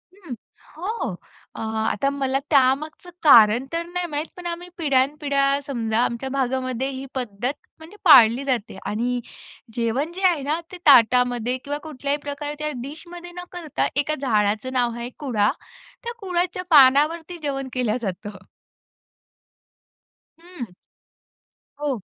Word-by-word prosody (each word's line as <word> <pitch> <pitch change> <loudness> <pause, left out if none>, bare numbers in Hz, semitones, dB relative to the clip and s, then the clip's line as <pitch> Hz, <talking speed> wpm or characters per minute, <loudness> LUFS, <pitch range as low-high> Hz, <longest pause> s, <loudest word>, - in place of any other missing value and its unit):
हं, 345 -11 -8 0.4
हो. 415 +7 -3 0.4
अ, - - -8
आता 220 +5 -1
मला 270 -1 -1
त्यामागचं 295 +5 +2
कारण 235 -3 +7
तर 335 0 -1
नाही 355 +1 -3
माहीत 300 -1 -3
पण 355 - -9
आम्ही 345 +1 -5
पिढ्यानपिढ्या 280 -1 +1
समजा 230 -4 -1
आमच्या 235 +3 -2
भागामध्ये 260 -1 -1
ही 265 0 -6
पद्धत 245 +1 -2 0.3
म्हणजे 325 +6 -13
पाळली 250 -4 +7
जाते 240 -7 -2
आणि 245 +4 -1 0.6
जेवण 245 +7 -1
जे 370 +3 -8
आहे 335 -5 +1
ना 305 +4 -1
ते 365 - -8
ताटामध्ये 245 -1 +5
किंवा 290 +1 -3
कुठल्याही 285 -2 -2
प्रकारच्या 295 +1 -4
डिशमध्ये 345 +5 -9
न 355 - -6
करता 340 -5 -2
एका 290 +2 +1
झाडाचं 215 0 0
नाव 245 -2 +1
आहे 235 +1 -5
कुळा, 220 -8 +1 0.5
त्या 470 0 -4
कुळाच्या 365 -2 -2
पानावरती 310 +4 +5
जेवण 275 -2 -3
केल्या 245 -3 0
जातं. 200 -1 -5 2.0
हं. 345 -8 -8 1.1
हो 290 -3 -1
275 Hz, 130 wpm, -23 LUFS, 245-315 Hz, 2.0 s, कारण